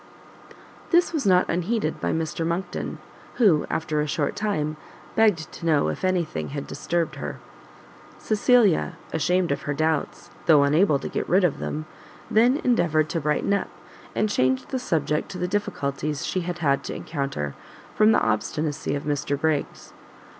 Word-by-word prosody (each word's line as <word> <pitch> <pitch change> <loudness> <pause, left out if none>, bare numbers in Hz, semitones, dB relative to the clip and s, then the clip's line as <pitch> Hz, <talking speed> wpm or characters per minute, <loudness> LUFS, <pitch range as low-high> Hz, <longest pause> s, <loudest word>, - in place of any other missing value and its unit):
This 345 0 +3
was 290 -10 0
not 180 -1 +4
unheeded 180 0 -1
by - - 0
Mr 160 0 -2
Monckton, 170 +3 -3 0.4
who, 190 -11 +4
after 155 -1 -1
a 150 - -1
short 145 0 -1
time, 155 -8 -1 0.4
begged 210 -8 +2
to 170 - -9
know 150 -3 +3
if - - -5
any 185 -2 +2
thing 155 - -5
had 140 0 -5
disturbed 170 -1 -2
her. - - -5 0.8
Cecilia, 215 -4 +3 0.2
ashamed 180 +1 +1
of 140 - -1
her 145 - -3
doubts, 155 0 -1 0.2
though 150 -4 +7
unable 150 +2 +4
to - - -6
get - - -3
rid 185 +3 +4
of 175 -5 +1
them, 155 +1 -4 0.5
then 240 +5 +4
endeavoured 165 -10 +2
to 165 - -2
brighten 150 +6 +1
up, 200 - 0 0.5
and 215 - +2
changed 130 -10 +1
the 260 - -2
subject 150 - -1
to 190 - -6
the 180 0 -1
difficulties 150 -7 -2
she 185 - -1
had 175 0 -4
had 140 -5 +1
to - - -4
encounter 140 - -3 0.4
from 215 +1 +5
the - - +4
obstinacy 145 +8 -1
of 140 - -4
Mr 145 -1 -1
Briggs. 155 -2 -2
160 Hz, 165 wpm, -24 LUFS, 150-190 Hz, 0.8 s, though